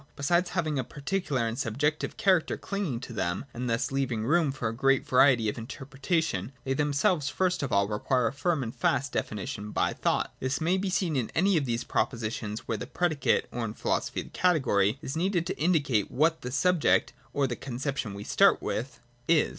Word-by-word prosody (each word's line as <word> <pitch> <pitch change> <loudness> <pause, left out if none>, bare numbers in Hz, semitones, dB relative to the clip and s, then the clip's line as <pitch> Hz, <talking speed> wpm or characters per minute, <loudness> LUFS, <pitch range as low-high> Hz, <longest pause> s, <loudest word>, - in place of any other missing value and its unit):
Besides 175 +6 +1
having 155 -6 -1
a - - 0
particular 140 -2 -2
and 115 +3 -4
subjective 145 +5 -1
character 185 -5 +2
clinging 190 -12 -3
to 130 - -8
them, 95 +2 -2
and 125 +1 -3
thus 115 +3 0
leaving 130 -5 -1
room 160 +1 +3
for 115 -4 -2
great 135 +3 +2
variety 125 -3 +5
of 105 - -2
interpreta 140 +6 -2
tion, 100 - -3
they 135 - -1
themselves 145 +2 +1
first 185 +2 0
of 140 - -3
all 100 0 +3
require 120 +4 0
a - - 0
firm 150 0 0
and 115 +1 -6
fast 135 +3 +1
definition 105 -2 -4
by - - 0
thought. - - 0
This 130 +1 -1
may 175 +4 +1
be 195 0 -1
seen 180 -4 0
in 125 -5 0
any 190 +3 +3
of 150 -4 +2
these 120 -1 -1
propositions 110 -2 -2
where 110 - -2
the - - -5
predicate, 160 -6 +1
or 120 - -3
in 110 -1 -4
philo - - +1
sophy - - -4
the - - -13
category, 130 - +2
is 135 - -4
needed 175 0 0
to 190 +2 -4
indicate 145 - +2
what 160 +5 +1
the 125 - -4
sub 180 +7 +2
ject, - - +3 0.2
or 140 - +1
the 125 -2 -2
conception 130 -4 -4
we 100 - -6
start - - +4
with, 120 +1 -4 0.3
is. 165 -2 +4
135 Hz, 200 wpm, -28 LUFS, 115-160 Hz, 0.3 s, variety